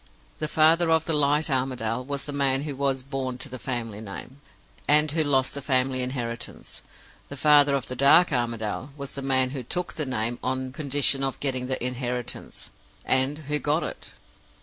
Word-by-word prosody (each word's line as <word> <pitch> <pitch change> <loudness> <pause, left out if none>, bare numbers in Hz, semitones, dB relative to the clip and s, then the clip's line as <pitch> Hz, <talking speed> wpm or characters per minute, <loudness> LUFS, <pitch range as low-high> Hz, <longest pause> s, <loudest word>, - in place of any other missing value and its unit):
The 155 - -1
father 160 +2 +4
of 160 -1 +3
the 165 - -1
light 150 +1 +2
Armadale 125 -4 -1
was 140 +1 -4
the 145 - -5
man 135 -1 +2
who 145 -2 -5
was 135 -1 0
born 130 -2 -4
to 130 - -7
the 130 -2 -8
family 115 -5 -4
name, 115 +6 -9 0.5
and 150 0 +4
who 160 +1 +1
lost 135 -3 +2
the 140 - -5
family 130 -1 0
inheritance. 120 -2 -5 0.5
The 140 - -8
father 145 -1 +5
of 135 - -2
the 125 - -5
dark 140 +7 +6
Armadale 120 +2 -2
was 140 0 -6
the 140 - -6
man 130 -1 +2
who 135 -2 -4
took 175 +9 -3
the 150 -3 -3
name, 120 -1 -2
on 130 0 -2
condition 140 -1 +2
of 135 -1 -2
getting 130 -3 -1
the 130 -2 -2
inheritance 125 -1 -5 0.3
and 130 +3 +2
who 150 0 +1
got - - 0
it. - - -6
135 Hz, 185 wpm, -25 LUFS, 125-145 Hz, 0.5 s, dark